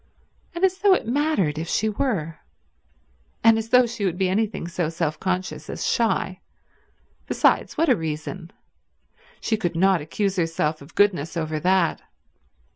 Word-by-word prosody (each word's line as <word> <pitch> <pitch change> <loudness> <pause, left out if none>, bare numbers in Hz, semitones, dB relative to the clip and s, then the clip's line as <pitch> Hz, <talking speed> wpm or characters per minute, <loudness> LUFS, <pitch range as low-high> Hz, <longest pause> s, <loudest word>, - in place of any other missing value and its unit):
And 345 +3 +3
as 375 0 0
though 400 -2 +5
it - - -3
mattered 235 - +1
if 165 - -4
she 220 - 0
were, 200 - -2 1.0
and 225 0 +7
as 225 0 -6
though 250 +1 +6
she 235 -3 -5
would 180 -3 0
be 190 -1 +1
anything 210 -2 -1
so 170 -2 -2
self 160 -2 -2
conscious 185 0 -3
as - - -4
shy. 220 -5 0 0.9
Besides, - - +2
what 330 - +2
a 255 - +5
reason. 160 +1 -5 0.9
She 220 - 0
could 175 -5 -2
not 190 0 +3
accuse 190 +6 -2
herself 165 -2 -1
of 140 +3 -15
goodness 175 -5 +2
over 155 -1 -2
that. 180 -1 +2
185 Hz, 155 wpm, -23 LUFS, 165-225 Hz, 1.0 s, and